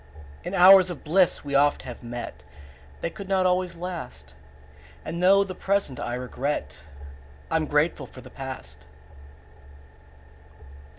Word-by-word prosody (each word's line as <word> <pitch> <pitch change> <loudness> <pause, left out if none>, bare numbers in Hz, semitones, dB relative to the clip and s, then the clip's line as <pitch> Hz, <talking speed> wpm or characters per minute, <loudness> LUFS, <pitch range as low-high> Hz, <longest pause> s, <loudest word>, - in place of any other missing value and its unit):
In 180 - -4
hours 185 0 +8
of 175 - -7
bliss 175 0 +2
we 140 - -5
oft 145 +1 +3
have 125 -2 -9
met: 120 -1 -7 0.5
5 - - -23
They - - -1
could 200 +1 -9
not 190 -1 +2
always 180 -1 +1
last; 165 - -7 0.7
And 170 +2 -4
though 195 +2 +6
the 190 -2 -6
present 195 -9 -1
I 120 - -3
regret, 125 - -4 0.7
I'm 160 -1 +1
grateful 150 +3 +1
for 130 - -13
the - - -14
past. 75 - -9
160 Hz, 135 wpm, -25 LUFS, 125-185 Hz, 0.7 s, hours